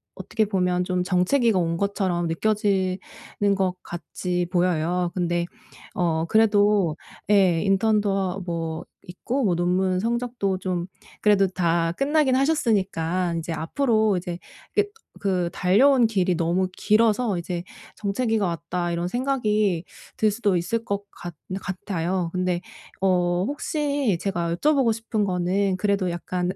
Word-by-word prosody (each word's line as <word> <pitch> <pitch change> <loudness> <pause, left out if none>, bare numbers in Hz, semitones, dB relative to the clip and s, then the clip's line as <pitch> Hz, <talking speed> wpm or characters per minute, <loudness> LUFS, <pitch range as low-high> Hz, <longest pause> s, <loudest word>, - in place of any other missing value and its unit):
어떻게 220 - -1
보면 180 -3 0
좀 180 0 0
정체기가 195 +5 +2
온 165 -1 0
것처럼 185 -3 0
느껴지는 190 +1 0 0.6
것 190 -2 0
같이 175 +1 -3
보여요. 175 0 +1
근데 175 -1 0 0.5
어 165 -3 +1
그래도 205 -6 +3 0.3
예 185 -5 +4
인턴도 205 +1 +2
하 190 -1 -1
뭐 165 -2 -3 0.2
있고 240 +9 -2
뭐 180 -4 +2
논문 180 +1 +1
성적도 235 -4 -1
좀 180 -2 -2 0.4
그래도 205 -2 +4
다 170 -2 0
끝나긴 275 - +2
하셨으니까 195 - +1
인제 165 0 -3
앞으로 215 - +1
이제 175 -1 -5 0.4
그 415 - +5 0.4
그 180 -3 0
달려온 240 +9 +4
길이 190 -4 +1
너무 175 +3 +1
길어서 215 -1 +2
이제 170 0 -4 0.3
'정체기가 215 +1 0
왔다.' 170 +1 -3
이런 170 +1 -2
생각이 215 -8 0 0.3
들 215 -1 +2
수도 205 -3 +1
있을 225 +7 -1
것 200 -1 -2
같 175 -2 -9 0.3
같아요. 185 -2 -2
근데 180 -1 -1 0.4
어 180 -1 +2
혹시 285 - -1
제가 170 -4 -1
여쭤보고 270 - +3
싶은 220 -2 -2
거는 185 +1 0
그래도 195 -1 0
약간 180 +1 -2
185 Hz, 270 characters per minute, -24 LUFS, 175-215 Hz, 0.6 s, 그